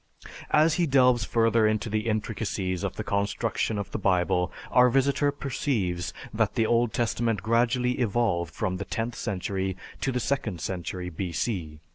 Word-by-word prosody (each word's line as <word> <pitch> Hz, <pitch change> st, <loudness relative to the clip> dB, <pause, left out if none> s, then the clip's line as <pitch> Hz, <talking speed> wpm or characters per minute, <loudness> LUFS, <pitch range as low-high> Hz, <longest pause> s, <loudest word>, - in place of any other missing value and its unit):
As 155 Hz, +1 st, +4 dB
he 170 Hz, -, +3 dB
delves 125 Hz, -4 st, +4 dB
further 115 Hz, -1 st, +3 dB
into 110 Hz, +1 st, 0 dB
the 110 Hz, +1 st, -1 dB
intricacies 105 Hz, -4 st, -2 dB
of -, -, -2 dB
the -, -, -4 dB
construction 100 Hz, +2 st, -1 dB
of 100 Hz, -2 st, -4 dB
the -, -, -3 dB
Bible, 90 Hz, -1 st, +1 dB, 0.2 s
our 125 Hz, 0 st, +6 dB
visitor 140 Hz, +3 st, +2 dB
perceives 115 Hz, -, -2 dB, 0.2 s
that -, -, 0 dB
the 115 Hz, -, +2 dB
Old 120 Hz, 0 st, +2 dB
Testament 115 Hz, -3 st, 0 dB
gradually 125 Hz, +2 st, +2 dB
evolved 100 Hz, -8 st, +1 dB
from 90 Hz, +3 st, -2 dB
the 100 Hz, -, -5 dB
tenth 115 Hz, +1 st, -3 dB
century 95 Hz, -1 st, -2 dB, 0.2 s
to 135 Hz, -, 0 dB
the 125 Hz, -, -1 dB
second 115 Hz, -8 st, -1 dB
century 90 Hz, +1 st, -4 dB
B.C. 85 Hz, -2 st, -3 dB
110 Hz, 155 wpm, -27 LUFS, 95-120 Hz, 0.2 s, our